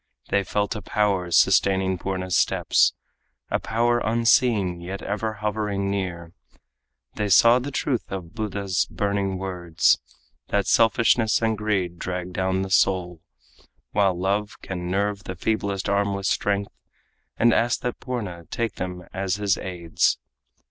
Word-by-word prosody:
They 100 Hz, 0 st, +2 dB
felt 105 Hz, +3 st, -1 dB
a 105 Hz, -, -5 dB
power 100 Hz, -3 st, 0 dB
sustaining 95 Hz, +1 st, +3 dB
Purna's 95 Hz, -2 st, -2 dB
steps -, -, +3 dB, 0.6 s
A -, -, +1 dB
power 120 Hz, +2 st, +1 dB
unseen 115 Hz, -5 st, +2 dB
yet 95 Hz, +3 st, -6 dB
ever 110 Hz, +2 st, -2 dB
hovering 105 Hz, -2 st, -2 dB
near 90 Hz, -4 st, -4 dB, 0.8 s
They 105 Hz, -1 st, -1 dB
saw 115 Hz, +6 st, +6 dB
the 130 Hz, +3 st, -5 dB
truth 130 Hz, -5 st, -2 dB
of 95 Hz, -2 st, -6 dB
Buddha's 100 Hz, -4 st, -1 dB
burning 100 Hz, -2 st, -1 dB
words 90 Hz, -3 st, +1 dB, 0.5 s
That 100 Hz, -1 st, 0 dB
selfishness 115 Hz, 0 st, +3 dB
and 110 Hz, -1 st, +2 dB
greed 95 Hz, -5 st, -1 dB
drag 90 Hz, 0 st, -4 dB
down 95 Hz, +1 st, 0 dB
the 95 Hz, -, -6 dB
soul, 90 Hz, -3 st, +2 dB, 0.7 s
While 95 Hz, -3 st, +2 dB
love 100 Hz, +3 st, -1 dB
can 90 Hz, -2 st, -5 dB
nerve 100 Hz, +1 st, -1 dB
the 95 Hz, -, -5 dB
feeblest 100 Hz, 0 st, -1 dB
arm 100 Hz, 0 st, +1 dB
with 100 Hz, 0 st, -5 dB
strength, 100 Hz, 0 st, 0 dB, 0.7 s
And 120 Hz, 0 st, +4 dB
asked 120 Hz, +2 st, +1 dB
that 125 Hz, -, -3 dB
Purna 100 Hz, -10 st, -5 dB
take 115 Hz, -4 st, -3 dB
them 90 Hz, -1 st, -5 dB
as 95 Hz, +1 st, -1 dB
his 100 Hz, -1 st, +1 dB
aids. 85 Hz, -3 st, 0 dB
100 Hz, 140 wpm, -24 LUFS, 95-105 Hz, 0.8 s, saw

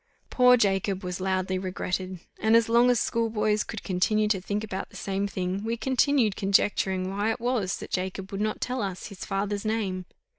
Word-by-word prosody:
Poor 250 Hz, -1 st, +6 dB
Jacob 195 Hz, -2 st, +1 dB
was 180 Hz, 0 st, -4 dB
loudly 185 Hz, 0 st, 0 dB
regretted; 185 Hz, 0 st, -3 dB, 0.2 s
and 220 Hz, +1 st, +4 dB
as 230 Hz, -1 st, +5 dB
long 235 Hz, +2 st, +5 dB
as 245 Hz, -2 st, +3 dB
schoolboys 215 Hz, -2 st, +1 dB
could 220 Hz, -, -7 dB
continue 210 Hz, +3 st, +1 dB
to 200 Hz, -3 st, +1 dB
think 205 Hz, +3 st, -2 dB
about 190 Hz, -3 st, -5 dB
the -, -, -17 dB
same 195 Hz, 0 st, -2 dB
thing, 185 Hz, 0 st, -3 dB
we 230 Hz, +1 st, -2 dB
continued 255 Hz, -2 st, +2 dB
conjecturing 195 Hz, -1 st, +1 dB
why 205 Hz, +3 st, 0 dB
it 225 Hz, -, -1 dB
was 230 Hz, -6 st, 0 dB
that -, -, -9 dB
Jacob 190 Hz, +1 st, -3 dB
would 195 Hz, +1 st, -3 dB
not 215 Hz, 0 st, -1 dB
tell 250 Hz, 0 st, -2 dB
us 190 Hz, -3 st, -4 dB
his 200 Hz, -, -8 dB
father's 200 Hz, +1 st, -2 dB
name. 200 Hz, -5 st, -2 dB
200 Hz, 190 wpm, -27 LUFS, 190-225 Hz, 0.2 s, Poor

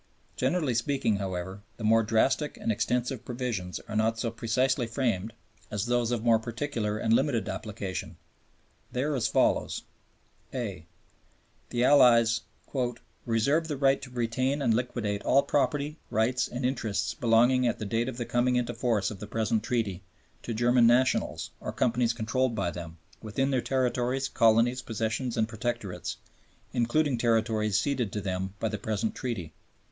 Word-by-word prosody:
Generally 135 Hz, 0 st, +1 dB
speaking, 120 Hz, -3 st, +1 dB
however, 95 Hz, 0 st, -4 dB, 0.2 s
the 115 Hz, -, -8 dB
more 115 Hz, +1 st, +5 dB
drastic 125 Hz, +7 st, +1 dB
and -, -, -1 dB
extensive 125 Hz, +3 st, -1 dB
provisions 120 Hz, -8 st, -3 dB
are 105 Hz, -, -8 dB
not 110 Hz, +1 st, +2 dB
so 115 Hz, 0 st, -2 dB
precisely 120 Hz, +3 st, 0 dB
framed 115 Hz, -4 st, -1 dB, 0.4 s
as 105 Hz, 0 st, -2 dB
those 120 Hz, -1 st, +1 dB
of 120 Hz, -2 st, -1 dB
more 115 Hz, -2 st, +4 dB
particular 115 Hz, -2 st, -3 dB
and 110 Hz, +1 st, +1 dB
limited 120 Hz, -4 st, +2 dB
application. 100 Hz, -4 st, -5 dB, 0.8 s
They 125 Hz, -, -1 dB
are 150 Hz, +1 st, 0 dB
as 130 Hz, -5 st, +1 dB
follows: -, -, +1 dB, 0.7 s
(a) 100 Hz, -10 st, -4 dB, 0.8 s
The 120 Hz, 0 st, 0 dB
Allies 120 Hz, -4 st, +6 dB, 0.9 s
"reserve 140 Hz, +8 st, +2 dB
the 150 Hz, -3 st, -3 dB
right 135 Hz, 0 st, +3 dB
to 135 Hz, -, -8 dB
retain 125 Hz, +3 st, 0 dB
and 120 Hz, -5 st, +2 dB
liquidate 110 Hz, -4 st, -1 dB
all 140 Hz, +2 st, +4 dB
property, 145 Hz, +1 st, 0 dB
rights 120 Hz, +3 st, +1 dB
and 125 Hz, +1 st, -4 dB
interests 120 Hz, -5 st, -1 dB
belonging 120 Hz, +1 st, +3 dB
at 120 Hz, -, 0 dB
the 110 Hz, -, -5 dB
date 115 Hz, +4 st, 0 dB
of 125 Hz, -, -7 dB
the 120 Hz, -, -3 dB
coming 125 Hz, +1 st, +1 dB
into 120 Hz, -1 st, 0 dB
force 115 Hz, -4 st, 0 dB
of 100 Hz, -, -8 dB
the 105 Hz, -, -7 dB
present 110 Hz, 0 st, 0 dB
Treaty 110 Hz, -5 st, -1 dB, 0.4 s
to 115 Hz, -, -4 dB
German 120 Hz, +1 st, +4 dB
nationals, 125 Hz, +2 st, +2 dB
or -, -, -4 dB
companies 120 Hz, -1 st, +1 dB
controlled 115 Hz, +2 st, 0 dB
by 95 Hz, -5 st, -1 dB
them, 85 Hz, -1 st, -8 dB, 0.2 s
within 135 Hz, +6 st, -1 dB
their 130 Hz, -2 st, +2 dB
territories, 130 Hz, +1 st, 0 dB
colonies, 115 Hz, +3 st, +3 dB
possessions 115 Hz, +2 st, -2 dB
and 110 Hz, -1 st, +2 dB
protectorates, 110 Hz, -5 st, -4 dB, 0.6 s
including 125 Hz, +2 st, +1 dB
territories 110 Hz, -3 st, +2 dB
ceded 125 Hz, -7 st, -1 dB
to 105 Hz, -, -3 dB
them 95 Hz, -1 st, -3 dB
by 110 Hz, -, 0 dB
the 105 Hz, -1 st, -3 dB
present 110 Hz, +1 st, -1 dB
Treaty." 95 Hz, -11 st, -4 dB
115 Hz, 155 wpm, -28 LUFS, 110-125 Hz, 0.9 s, Allies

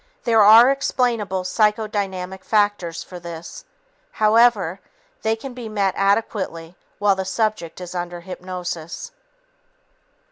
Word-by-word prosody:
There 225 Hz, -2 st, +4 dB
are 225 Hz, +5 st, +8 dB
explainable 235 Hz, -8 st, 0 dB
psychodynamic 195 Hz, -2 st, -1 dB
factors 205 Hz, -6 st, 0 dB
for 180 Hz, -, -10 dB
this. 170 Hz, -, -9 dB, 0.5 s
However, 215 Hz, -4 st, +3 dB, 0.4 s
they 220 Hz, 0 st, +1 dB
can 250 Hz, +3 st, -8 dB
be 240 Hz, -3 st, -7 dB
met 200 Hz, -3 st, 0 dB
adequately 195 Hz, -4 st, -1 dB, 0.2 s
while 205 Hz, -1 st, +3 dB
the 190 Hz, -, -2 dB
subject 190 Hz, -4 st, -2 dB
is 180 Hz, -1 st, -8 dB
under 175 Hz, -1 st, -5 dB
hypnosis. 180 Hz, -, -6 dB
200 Hz, 110 wpm, -21 LUFS, 180-220 Hz, 0.5 s, are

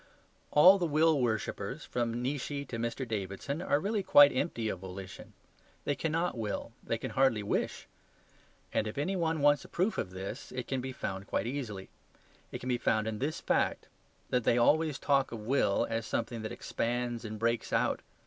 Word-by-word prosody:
All 185 Hz, +6 st, +7 dB
the 175 Hz, -, +1 dB
will 155 Hz, -1 st, +3 dB
worshippers, 110 Hz, -3 st, -2 dB
from 120 Hz, 0 st, -2 dB
Nietzsche 140 Hz, +1 st, -2 dB
to 115 Hz, -, -5 dB
Mr. 120 Hz, +3 st, -2 dB
Davidson, 110 Hz, -, -3 dB
are 145 Hz, -, +2 dB
really 205 Hz, +4 st, 0 dB
quite 145 Hz, -6 st, +7 dB
empty 120 Hz, -5 st, -1 dB
of 95 Hz, -, -3 dB
volition. 95 Hz, 0 st, -9 dB, 0.5 s
They 145 Hz, -, +1 dB
cannot 165 Hz, +3 st, -1 dB
will, 110 Hz, -3 st, -3 dB
they -, -, -1 dB
can -, -, -5 dB
hardly 130 Hz, -6 st, +2 dB
wish. 100 Hz, -, -2 dB, 0.9 s
And 110 Hz, -, +1 dB
if 110 Hz, -, -6 dB
any 180 Hz, +7 st, 0 dB
one 165 Hz, -3 st, 0 dB
wants 145 Hz, -1 st, +4 dB
a -, -, -11 dB
proof 190 Hz, +5 st, 0 dB
of -, -, -2 dB
this, 95 Hz, +6 st, -7 dB
it 125 Hz, -1 st, -3 dB
can 135 Hz, -1 st, -1 dB
be 130 Hz, +1 st, -4 dB
found 95 Hz, -5 st, -5 dB
quite -, -, -1 dB
easily. 115 Hz, -7 st, -4 dB, 0.6 s
It -, -, -4 dB
can 130 Hz, -, -6 dB
be 125 Hz, -1 st, +1 dB
found 110 Hz, -1 st, +1 dB
in 110 Hz, -1 st, -3 dB
this 150 Hz, +4 st, -2 dB
fact: -, -, +1 dB, 0.5 s
that 125 Hz, -1 st, +2 dB
they 115 Hz, -, +3 dB
always 150 Hz, +4 st, +3 dB
talk 140 Hz, -2 st, +2 dB
of 115 Hz, -2 st, -6 dB
will 115 Hz, -5 st, +2 dB
as 115 Hz, 0 st, -2 dB
something 115 Hz, -1 st, -2 dB
that 110 Hz, -, -5 dB
expands 120 Hz, 0 st, -2 dB
and 110 Hz, -1 st, -5 dB
breaks 115 Hz, +2 st, 0 dB
out. -, -, +1 dB
125 Hz, 185 wpm, -31 LUFS, 110-145 Hz, 0.9 s, All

